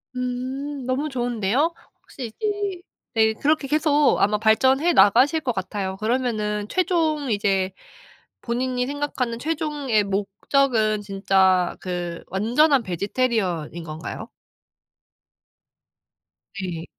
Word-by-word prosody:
음. 255 +2 -4
너무 270 +4 -1
좋은데요. 245 - 0 0.3
혹시 240 -5 -8
이제 405 -4 -2 0.3
네 220 -1 +3
그렇게 290 +4 0
계속 300 0 +3
아마 210 +1 +3
발전해 260 +10 +3
나가실 250 +11 +5
것 255 - -1
같아요. 190 0 -4
그러면은 215 -3 -1
최종 320 -6 0
이제 195 -2 +1 0.7
본인이 250 +1 -1
생각하는 275 -5 -3
최종의 295 -7 0
목적은 215 +3 +1
진짜 190 -2 +2
그 175 -2 -4
완전한 245 - +3
베지테리언인 185 -4 -1
건가요? 160 +7 -7 2.3
네. 170 -2 -5
240 Hz, 235 characters per minute, -23 LUFS, 200-285 Hz, 2.3 s, 나가실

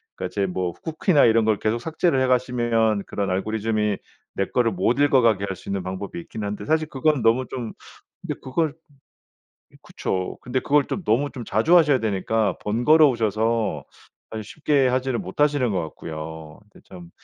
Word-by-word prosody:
그러니까 - - -5
이제 100 -1 0
뭐 90 -1 -2
쿠키나 160 - +2
이런 115 -1 +4
걸 110 -1 +2
계속 110 +2 0
삭제를 160 +1 0
해 130 - +2
가시면 120 -4 +1
그런 100 -1 -3
알고리즘이 105 +1 -1 0.4
내 95 - 0
거를 115 +2 +1
못 95 +8 0
읽어 140 -2 +4
가게 110 -4 +2
할 95 - -4
수 - - -16
있는 100 -1 -2
방법이 95 +1 -6
있긴 105 +5 -7
한데 105 0 -4
사실 155 +3 +1
그거는 150 0 +1
너무 115 +3 +3
좀 120 -4 -5 0.5
근데 - - -3
그걸 150 +3 -1 1.1
그쵸. 95 -1 -4
근데 125 +1 -1
그걸 145 +1 +2
좀 195 - -4
너무 140 +3 +1
좀 125 -4 -7
자주 115 - +3
하셔야 145 -6 +4
되니까 110 -1 0
번거로우셔서 115 -3 +2 0.5
사실 110 -1 -5
쉽게 140 +4 +1
하지를 130 -1 0
못하시는 145 -5 +1
것 95 - 0
같고요. 80 0 -8
근데 - - -18
참 90 -3 -12
115 Hz, 355 characters per minute, -23 LUFS, 100-135 Hz, 1.1 s, 이런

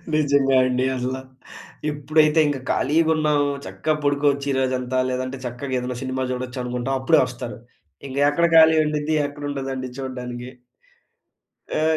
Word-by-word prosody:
నిజంగా 140 -3 +3
అండి! 130 0 0
అసలు 130 +1 -3 0.7
ఎప్పుడైతే 150 +2 +2
ఇంక 145 -1 -1
ఖాళీగున్నావో, 155 -2 +2 0.2
చక్కగా 155 - -1
పడుకోవచ్చు 145 0 +1
ఈ - - 0
రోజంతా 130 -1 -1
లేదంటే 130 +1 -3
చక్కగా 125 +2 -5
ఏదైనా 125 0 -4
సినిమా 130 0 -2
చూడొచ్చనుకుంటాం, 125 0 -3
అప్పుడే 160 +4 +4
వస్తారు. 120 0 -7 0.5
ఇంగా 135 +2 -2
ఎక్కడ 170 +4 +2
ఖాళీ 160 0 +7
ఉండుద్ది? 150 0 -1
ఎక్కడ 145 0 -10
ఉంటదండి 135 -2 -4
చూడడానికి. 125 -2 -6 1.2
ఆ! - - 0
135 Hz, 125 wpm, -22 LUFS, 130-145 Hz, 1.2 s, ఖాళీ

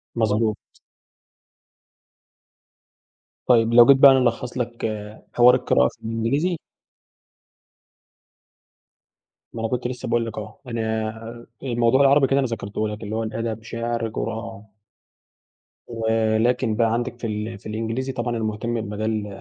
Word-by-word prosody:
مضبوط. 110 -1 -1 2.7
طيب، 115 -2 +4
لو 120 0 +9
جيت 140 -1 +7
بقى 135 0 +9
أنا 135 - +4
ألخّص 125 0 -1
لك 120 -1 -3 0.5
حوار 125 +1 +6
القراءة 65 - +2
في - - -10
الإنجليزي 140 +10 -1 2.9
ما 115 - -5
أنا 115 - 0
كنت 125 0 -2
لسه 125 0 -6
باقول 120 0 +1
لك 110 -2 -7
أهو، 105 - -7
أنا 115 0 -4 0.2
الموضوع 120 0 +2
بالعربي 140 0 +5
كده 135 +1 +2
أنا 130 - +1
ذكَرته 110 -1 -3
لك، 105 +1 -7
اللي 105 +1 -4
هو 115 - -1
أدب، 110 0 -4
شِعر، 115 0 -3
قرآن. 110 0 -5 1.2
ولكن 115 +1 +1
بقى 115 0 +2
عندك 120 +1 -3
في 115 - -3
ال 105 0 -4
في - - -27
الإنجليزي، 115 +5 -3
طبعًا 120 -2 -2
أنا 110 - -3
مُهتم 110 +2 -2
بمجال 105 0 -3
115 Hz, 130 wpm, -23 LUFS, 110-120 Hz, 2.9 s, لو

